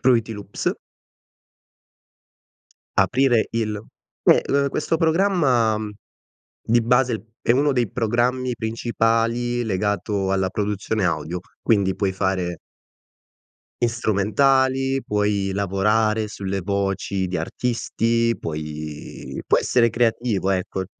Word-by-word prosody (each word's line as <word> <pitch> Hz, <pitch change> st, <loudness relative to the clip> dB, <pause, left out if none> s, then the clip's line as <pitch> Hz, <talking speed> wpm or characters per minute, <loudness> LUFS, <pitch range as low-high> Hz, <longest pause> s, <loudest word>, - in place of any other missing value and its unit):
Fruity 115 Hz, -3 st, +2 dB
Loops. 105 Hz, -1 st, -3 dB, 2.2 s
Aprire 125 Hz, -3 st, +3 dB
il 110 Hz, -2 st, -1 dB, 0.5 s
Eh, -, -, +6 dB
uhm, 140 Hz, 0 st, +2 dB
questo 155 Hz, +3 st, -1 dB
programma, 160 Hz, -, +2 dB
mhmm, 105 Hz, -1 st, -4 dB, 0.7 s
di 120 Hz, +1 st, +3 dB
base 120 Hz, -1 st, +2 dB, 0.2 s
è -, -, 0 dB
uno 140 Hz, +4 st, +3 dB
dei 120 Hz, -5 st, 0 dB
programmi 125 Hz, +2 st, 0 dB
principali 115 Hz, +1 st, 0 dB
legato 100 Hz, -1 st, -1 dB
alla 95 Hz, -1 st, +1 dB
produzione 105 Hz, 0 st, -1 dB
audio, 85 Hz, +1 st, -1 dB, 0.2 s
quindi, 100 Hz, -4 st, +2 dB
puoi 95 Hz, -2 st, 0 dB
fare 95 Hz, -3 st, -1 dB, 1.2 s
i 120 Hz, -, +4 dB
strumentali, 130 Hz, +5 st, +2 dB
puoi 105 Hz, -1 st, 0 dB
lavorare 105 Hz, +3 st, +1 dB
sulle 100 Hz, -1 st, -4 dB
voci 100 Hz, 0 st, -1 dB
di 90 Hz, 0 st, -3 dB
artisti, 115 Hz, +4 st, 0 dB
puoi 75 Hz, -1 st, -6 dB
puoi -, -, +4 dB
essere 115 Hz, -2 st, +3 dB
creativo, 115 Hz, -4 st, 0 dB
ecco. 95 Hz, 0 st, -1 dB
110 Hz, 105 wpm, -22 LUFS, 95-120 Hz, 2.2 s, Eh